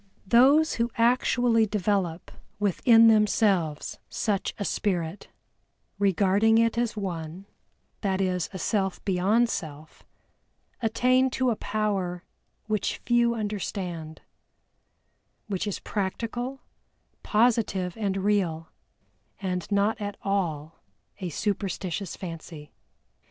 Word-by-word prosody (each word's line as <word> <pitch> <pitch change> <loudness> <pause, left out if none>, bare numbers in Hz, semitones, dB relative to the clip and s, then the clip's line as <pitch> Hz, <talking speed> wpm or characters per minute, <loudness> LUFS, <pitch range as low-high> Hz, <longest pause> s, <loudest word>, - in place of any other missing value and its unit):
Those 270 +9 +5
who 235 - +1
actually 235 -1 +3
develop 195 -4 -1 0.3
within 225 +3 +5
themselves 205 -7 +2
such 205 -3 -1
a 205 - -3
spirit, 180 -3 -2 0.7
regarding 200 +3 +3
it 230 0 +3
as 235 -2 -1
one, 175 -2 -5 0.6
that 195 -2 0
is 180 -3 0
a 190 - -6
self 190 +1 -1
beyond 200 +5 +2
self, 155 -7 -7 0.8
attain 255 +3 +3
to 255 -2 +2
a - - 0
power 195 -5 -2 0.4
which 215 -2 -1
few 240 -1 +3
understand, 185 -7 -4 1.2
which 205 -1 -3
is 205 - -2
practical, 235 +6 -3 0.6
positive, 215 -6 +1
and 200 -3 -1
real, 185 -5 0 0.7
and 185 -1 -3
not 205 +2 +1
at 205 -1 -4
all 165 -6 -2 0.4
a 185 -3 -3
superstitious 195 -1 -3
fancy. 165 -4 -9
200 Hz, 100 wpm, -26 LUFS, 180-225 Hz, 1.2 s, Those